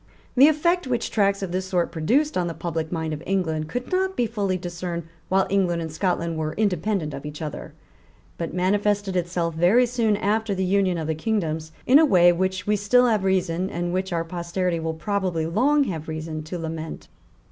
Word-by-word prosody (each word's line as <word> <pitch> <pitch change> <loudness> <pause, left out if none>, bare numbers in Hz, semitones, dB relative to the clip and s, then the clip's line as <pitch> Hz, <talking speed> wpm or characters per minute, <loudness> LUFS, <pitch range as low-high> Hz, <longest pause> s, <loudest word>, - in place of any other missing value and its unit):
The 265 +3 +8
effect 340 +1 +2
which 240 -2 -1
tracts 200 -2 +2
of 185 - -4
this 185 +1 -2
sort 180 -2 0
produced 250 - +1
on 180 -1 0
the 165 - -4
public 165 -1 -3
mind 160 -2 -2
of 150 - -5
England 160 -5 -1
could 245 +5 -4
not 380 +1 +1
be 245 - +1
fully 200 -5 -1
discerned, 175 -1 -5 0.3
while 190 0 +3
England 180 -4 +2
and 160 -1 -4
Scotland 170 -1 -1
were 155 0 -2
independent 195 -5 0
of 140 - -7
each 150 0 -7
other, 155 -2 -6 0.6
but 170 - -4
manifested 200 +1 0
itself, 175 -1 -1
very 180 +10 +4
soon 230 -4 +1
after 215 0 0
the 190 0 0
union 190 -1 +2
of 160 - -3
the 160 - 0
kingdoms, 160 -4 -2
in 270 +4 +7
a - - +6
way 175 - +6
which 185 +2 -1
we 210 - +2
still 210 +5 +4
have 215 -5 +2
reason, 185 -1 0
and 175 -1 -3
which 190 +1 -1
our 165 -1 -1
posterity 170 +1 -2
will 160 0 -3
probably 180 -2 -1
long 265 - +3
have 165 - -4
reason 155 0 -4
to 175 +3 -5
lament. 160 -1 -6
185 Hz, 200 wpm, -24 LUFS, 165-205 Hz, 0.6 s, The